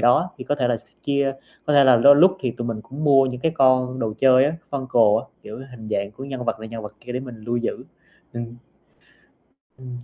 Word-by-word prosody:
đó, 125 +10 +3
thì 125 - -7
có 145 - -1
thể 130 -4 -1
là 120 - +1
s - - -16 0.2
chia 140 -1 0 0.3
có 150 - +1
thể 140 -1 +6
là 130 -2 +6
lôi 140 +5 +7
lúc 185 +5 +5
thì 125 - -1
tụi 120 0 -6
mình 115 -2 -4
cũng 135 +7 -7
mua 135 -2 +5
những 125 -1 -5
cái 160 +1 0
con 130 -2 +2
đồ 115 -3 -2
chơi 130 +1 +5
á, 155 +3 -1
Funko 120 -6 +2
á, - - -8 0.2
kiểu 110 +4 -9
hình 110 -3 -11
dạng 100 -1 -2
của 125 +6 -10
nhân 130 -2 -6
vật 115 - -2
này 110 - -8
nhân 115 -1 -7
vật 105 0 -9
kia 125 - -8
để 125 - -3
mình 125 -3 -9
lưu 120 +1 -2
giữ. 120 0 -3 0.5
Ừm. 120 0 -6 1.2
Ừm. 125 -1 -9
125 Hz, 245 wpm, -22 LUFS, 115-135 Hz, 1.2 s, lôi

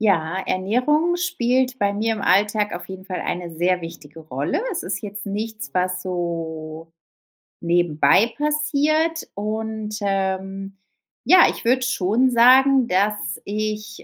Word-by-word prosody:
Ja, 180 -5 +1
Ernährung 275 - +1
spielt 260 -8 0
bei 200 0 +1
mir 220 +2 0
im 215 - -7
Alltag 210 +1 +2
auf 175 0 -7
jeden 190 0 -9
Fall 185 -3 -4
eine 175 -2 -4
sehr 180 +2 +1
wichtige 165 -2 -10
Rolle. 145 - -2
Es 375 - -3
ist 190 +1 -4
jetzt 205 -1 -7
nichts, 215 -4 -5
was 180 0 -1
so 165 -3 -5 0.7
nebenbei 175 +6 +2
passiert, 300 +2 0
und, 215 0 -4
ähm, 195 0 -2 0.5
ja, 365 -1 +7
ich - - -6
würde 255 +2 +2
schon 250 +1 +1
sagen, 255 +2 +5
dass 205 +1 0
ich, 210 0 -4
205 Hz, 135 wpm, -22 LUFS, 180-245 Hz, 0.7 s, ja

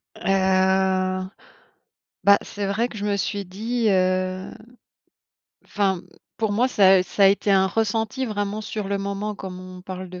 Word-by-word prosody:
Heu, - - -15 2.0
bah 200 0 +7
c'est 205 -1 -5
vrai 215 +5 0
que 220 - -9
je 205 - -4
me 205 -1 0
suis 200 0 -2
dit, 220 +5 -2
heu, 185 -1 0 1.1
enfin 195 -3 0 0.4
pour 220 -2 -1
moi 240 +5 +2
ça, 195 -5 +5
heu, - - +2
ça 190 +2 +1
a - - +9
été 200 +1 +2
un 190 -1 +4
ressenti 225 +5 -1
vraiment 205 -2 -3
sur 215 -1 -5
le 200 0 -1
moment 200 +1 -3
comme 190 -2 -8
on 185 0 -10
parle 185 0 -7
de 180 0 -9
200 Hz, 165 wpm, -23 LUFS, 185-215 Hz, 2.0 s, a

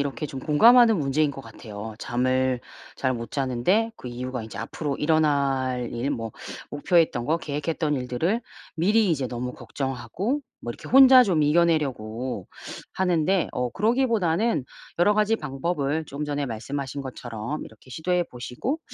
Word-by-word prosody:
이렇게 140 +2 -2
좀 135 -2 -7
공감하는 225 - +6
문제인 145 +1 +1
것 135 - -8
같아요. 110 -3 -9
잠을 130 +1 +1 0.4
잘 130 -1 0
못 115 -2 -6
자는데 140 - +1
그 125 - -8
이유가 125 0 -5
인제 110 - -9
앞으로 145 -3 -3
일어날 140 -5 +1
일 120 +4 -2
뭐 115 -5 -4 0.4
목표했던 150 -4 +2
거 160 - +2
계획했던 150 0 -2
일들을 135 - -1 0.3
미리 205 +5 +3
이제 140 -6 0
너무 125 +1 -4
걱정하고 170 - -3 0.2
뭐 120 - -5
이렇게 - - -11
혼자 265 0 +9
좀 180 -9 +2
이겨내려고 130 - 0 0.4
하는데 180 0 +1
어 125 0 -1
그러기보다는 220 - +1 0.3
여러 205 +4 +4
가지 215 +1 +2
방법을 150 +1 -2
좀 145 +2 -5
전에 145 -1 -2
말씀하신 135 +4 -4
것처럼 120 +1 -5
이렇게 110 +4 -16
시도해 175 +6 0
보시고 125 - -4
145 Hz, 335 characters per minute, -25 LUFS, 125-175 Hz, 0.4 s, 혼자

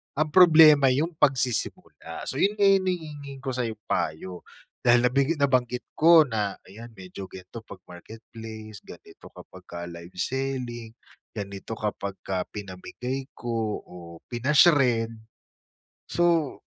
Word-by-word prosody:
ang 155 +1 -1
problema 155 -6 +7
yung 160 +5 0
pagsisimula. 130 -3 -1
So - - -4
yun 205 +2 +2
nga - - +3
yung 195 -1 +3
hinihingi 145 -6 -5
ko 130 - -2
sa'yong 115 -4 -4
payo. 90 +3 -3 0.4
Dahil 120 0 +5
nabig 140 +5 +1
nabanggit 125 -3 0
ko 165 0 +7
na 105 -6 -3
ayan 110 +5 -11
medyo 95 0 -9
gan'to 95 +5 -10
'pag 100 - -12
Marketplace, 110 +2 -11
ganito - - -14
kapag - - -14
ka 85 - -8
live 85 +1 -11
selling, 125 0 -4 0.4
ganito 100 +1 -6
kapagka 100 -3 -4
pinamigay 120 +7 -6
ko 115 -3 -3
o 90 - -15 0.4
pina-shred. 125 -3 +3 1.0
So, 170 -4 +1
120 Hz, 120 wpm, -25 LUFS, 105-140 Hz, 1.0 s, problema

